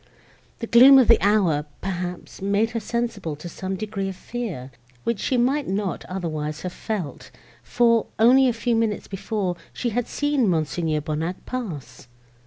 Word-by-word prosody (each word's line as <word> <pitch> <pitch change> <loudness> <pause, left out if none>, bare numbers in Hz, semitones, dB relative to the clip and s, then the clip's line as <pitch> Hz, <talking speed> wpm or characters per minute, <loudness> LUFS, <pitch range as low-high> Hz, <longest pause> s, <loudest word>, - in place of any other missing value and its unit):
The 230 - -4
gloom 255 +4 +8
of 260 - +5
the 230 - +6
hour, 190 -8 +3 0.2
perhaps, 180 -2 -5
made 200 +3 +1
her 230 - -2
sensible 225 -7 -3
to 150 +4 -9
some 190 +3 -5
degree 200 -1 -3
of 190 - -6
fear, 185 - -6 0.3
which 235 -3 -1
she 255 - 0
might 265 +4 +1
not 195 -1 -2
otherwise 155 -4 -4
have 180 -1 -4
felt; 195 -10 -5 0.3
for, 230 -2 +2
only 255 +4 +6
a - - +3
few 235 +1 0
minutes 225 -2 -1
before, 195 -2 -3
she 245 - -2
had 240 +1 -2
seen 290 -5 +1
Mons. 160 -5 0 0.3
Bonnac 160 +4 -4
pass. 150 - -6
205 Hz, 160 wpm, -23 LUFS, 175-235 Hz, 0.3 s, gloom